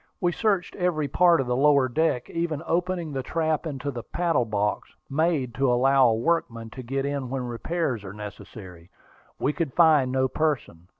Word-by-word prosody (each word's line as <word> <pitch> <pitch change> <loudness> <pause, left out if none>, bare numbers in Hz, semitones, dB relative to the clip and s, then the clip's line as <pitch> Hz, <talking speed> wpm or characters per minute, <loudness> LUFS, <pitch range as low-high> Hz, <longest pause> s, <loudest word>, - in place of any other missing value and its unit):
We 175 -2 +1
searched 195 -1 0
every 175 -5 0
part 175 +4 +4
of 135 - 0
the 125 0 -1
lower 140 0 +4
deck, 130 -1 0
even 165 -3 -3
opening 175 -1 -1
the 135 - -2
trap 160 +3 -1
into 140 -1 -4
the 120 -3 -6
paddle 165 -3 0
box, 105 -1 -1 0.2
made 150 -4 0
to 135 +1 +1
allow 135 +1 +4
a 115 - +2
workman 115 -4 -1
to 130 - -8
get 135 +3 -3
in 140 -3 -3
when 130 0 -3
repairs 125 - -2
were 95 - -7
necessary. 100 -4 -10 0.5
We 145 - 0
could 160 -6 -3
find 155 -6 +5
no 130 0 +2
person. 130 - -2
135 Hz, 180 wpm, -25 LUFS, 120-165 Hz, 0.5 s, find